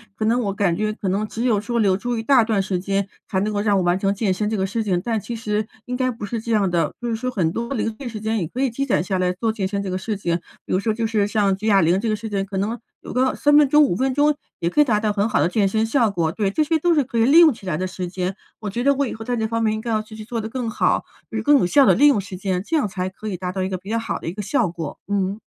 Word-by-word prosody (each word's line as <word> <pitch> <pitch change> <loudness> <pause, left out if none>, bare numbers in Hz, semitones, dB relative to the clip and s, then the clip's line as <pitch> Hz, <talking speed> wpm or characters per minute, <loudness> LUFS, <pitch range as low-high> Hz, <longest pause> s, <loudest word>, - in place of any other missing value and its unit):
可 - - -4
能 230 +3 +2
我 200 -2 -1
感 190 -4 +1
觉 215 +1 -1
可 205 -3 -3
能 205 +3 0
只 225 +2 -4
有 230 -5 +2
说 235 +3 -3
留 195 -4 +3
住 240 +3 -2
一 225 - -3
大 260 +1 +5
段 220 -3 +1
时 190 -1 -2
间 195 +1 -1 0.2
才 190 - 0
能 210 +2 0
够 205 - -1
让 205 -1 +2
我 185 - +1
完 175 +1 +2
成 195 0 +1
健 200 -2 +1
身 210 +3 -1
这 220 - -1
个 190 -2 0
事 215 +4 -2
情， 185 -5 0
但 230 -2 0
其 235 +4 -6
实 215 -1 -2 0.2
应 250 0 -3
该 255 0 +1
不 230 -4 -5
是 230 +3 -3
这 230 +1 -3
样 200 -4 +2
的， 170 -1 0
就 240 - -2
是 225 - -1
说 255 +3 -2
很 180 -10 0
多 235 +7 -3
零 225 -3 -1
碎 275 - -6
时 220 -3 -6
间 220 0 0
也 170 - -2
可 250 - -5
以 270 - +2
积 275 +4 -2
攒 250 - +1
下 190 0 -1
来 180 0 +1
做 220 +5 -1
健 205 -4 -2
身 200 0 -3
这 195 - -4
个 185 - -2
事 210 +3 -3
情， 170 -4 -1 0.3
比 - - -8
如 185 - +2
说 220 +2 0
就 225 +1 -2
是 215 -2 +1
像 205 -2 +2
举 215 +3 -4
哑 200 -3 +5
铃 175 +3 +3
这 230 - -2
个 215 - +1
事 220 +1 -6
情， 195 -2 -1
可 195 0 -8
能 215 +5 -2 0.2
有 - - -9
个 260 +1 +1
3 290 0 +4
分 295 -1 +6
钟、 300 +2 +5
5 275 - +2
分 265 +2 +1
钟 295 +2 +3 0.2
也 170 - 0
可 240 - -1
以 - - +9
达 220 -6 +2
到 215 -1 +1
很 205 +1 +1
好 225 - +1
的 - - +3
健 200 +1 +2
身 220 +3 +1
效 230 -1 +2
果， 170 -5 0
对， 200 +2 -1
这 310 - +2
些 320 +1 +1
都 345 +2 +3
是 300 -3 +3
可 240 -2 -5
以 225 - +4
利 290 +7 +7
用 325 -4 +7
起 210 - -14
来 160 -4 -1
的 185 - -2
时 185 -1 -5
间， 185 +1 -3 0.2
我 215 - -6
觉 235 +5 -3
得 280 +1 +4
我 280 +1 +1
以 - - -5
后 225 - -7
在 245 +2 -2
这 220 - 0
方 230 +1 -1
面 215 -1 +2
应 215 - -3
该 235 - -5
要 215 -1 +1
继 215 0 -12
续 215 - -8
做 230 0 -3
的 220 - -5
更 245 -1 -3
好， - - +1 0.3
就 225 - -4
是 215 - -2
更 290 +4 +6
有 - - +2
效 275 +9 +5
的 - - +6
利 290 - +5
用 280 -8 +4
时 195 -1 -7
间， 185 -1 -2
这 325 - -1
样 290 -9 +2
才 185 -1 -3
可 210 +3 -9
以 195 -4 -3
达 180 0 -4
到 190 0 -3
一 185 - -1
个 185 - -2
比 190 +3 -12
较 230 - +1
好 225 - -3
的 - - -8
一 165 - -2
个 210 - -5
效 220 +1 +1
果， 165 -3 -6
嗯。 200 0 -1
215 Hz, 370 characters per minute, -22 LUFS, 195-235 Hz, 0.3 s, 以